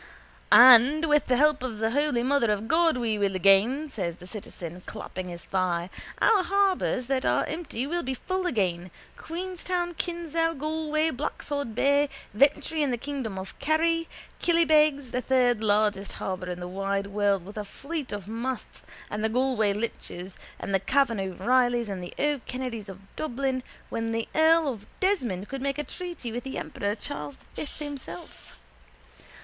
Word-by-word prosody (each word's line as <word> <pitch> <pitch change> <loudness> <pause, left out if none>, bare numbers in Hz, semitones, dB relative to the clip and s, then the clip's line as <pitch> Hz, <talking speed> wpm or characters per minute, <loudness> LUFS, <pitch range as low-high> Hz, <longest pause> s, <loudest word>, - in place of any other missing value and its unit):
—And 255 +5 +8
with 295 -1 +3
the 250 - +3
help 300 +1 +4
of 250 -4 -4
the 220 +1 0
holy 285 -3 +1
mother 260 -4 +2
of 210 +1 -2
God 325 0 +3
we 225 -3 -1
will 200 -1 +1
again, 200 - +4
says 185 - -3
the 180 - -13
citizen, 180 -3 -8
clapping 185 0 -6
his 175 -1 -8
thigh. 180 -2 -1 0.3
Our 430 -4 +5
harbours 385 -8 +1
that 260 0 0
are - - +2
empty 310 -6 -4
will 345 +4 -1
be 260 -2 -3
full 370 +7 -2
again, 185 - -1 0.3
Queenstown, 355 0 -3
Kinsale, 330 -1 -1
Galway, 310 +1 0
Blacksod 285 -3 -4
Bay, 285 +3 +3 0.2
Ventry 285 +6 +2
in 290 - +2
the 245 - 0
kingdom 255 -6 -4
of 190 0 -6
Kerry, 330 +2 +1 0.3
Killybegs, 305 -6 +3
the 250 - -1
third 250 -3 +2
largest 205 -1 +2
harbour 185 -1 -4
in 180 0 -4
the 175 - -4
wide 195 +2 -2
world 200 -2 +1
with 205 +2 -10
a - - -2
fleet 280 +8 -6
of 205 -2 -5
masts 240 +4 -4 0.3
of 210 - -3
the 220 - +1
Galway 245 -3 +2
Lynches 195 -3 -5 0.2
and 195 - -4
the 195 - +4
Cavan 235 +2 +2
O'Reillys 240 +5 +1
and 190 -2 -4
the 175 - -8
O'Kennedys 255 -6 -2
of 190 0 -9
Dublin 265 -2 -1 0.3
when 225 0 -2
the 230 0 -1
earl 320 0 +5
of 225 -7 -4
Desmond 245 - 0
could 270 -1 -5
make 275 0 -1
a 295 - -1
treaty 345 -9 -6
with 240 +1 -4
the 265 - -5
emperor 205 +1 -3
Charles 150 -8 -6
the - - -25 0.2
Fifth - - -12
himself. 280 - -8
250 Hz, 165 wpm, -27 LUFS, 205-300 Hz, 0.3 s, And